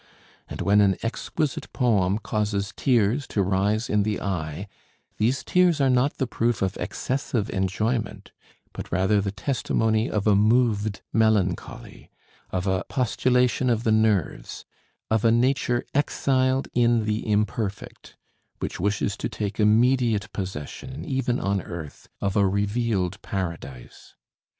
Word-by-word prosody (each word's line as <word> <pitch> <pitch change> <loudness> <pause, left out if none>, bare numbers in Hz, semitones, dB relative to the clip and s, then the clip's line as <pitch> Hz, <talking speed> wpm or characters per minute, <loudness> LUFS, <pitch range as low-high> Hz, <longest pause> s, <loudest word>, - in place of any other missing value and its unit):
And - - -6
when 105 +1 +4
an 100 -2 +4
exquisite 140 +5 -3
poem 105 -7 +2
causes 105 -2 -2
tears 120 +1 +1
to 100 - 0
rise 100 +4 0
in 105 - +2
the 105 0 -1
eye, 90 -1 -4 0.5
these 120 +5 +1
tears 180 -3 +3
are 135 -2 +3
not 125 +3 +1
the 135 - 0
proof 120 -3 0
of 95 0 -1
excessive 125 -5 -2
enjoyment, 105 +5 -2 0.4
but - - -8
rather 95 +4 +2
the 100 - -2
testimony 110 0 0
of 105 -2 -1
a 105 -2 +5
moved 110 -1 +2
melancholy, 105 -5 0 0.4
of 95 0 -2
a 95 -2 0
postulation 125 0 +1
of 115 -1 +1
the 110 - +2
nerves, 105 - 0 0.5
of 110 -1 +2
a 115 - +5
nature 120 0 +1
exiled 130 -2 +1
in 120 -2 +3
the 110 0 -2
imperfect, 105 0 -3 0.4
which - - -5
wishes 100 +1 0
to - - -3
take 105 0 -4
immediate 115 0 +3
possession, 95 - -6
even 130 -3 -1
on 100 0 0
earth, 80 -4 -9
of 100 -1 -1
a 100 -2 +4
revealed 100 -1 -1
paradise. 85 - -6
110 Hz, 135 wpm, -25 LUFS, 100-120 Hz, 0.5 s, a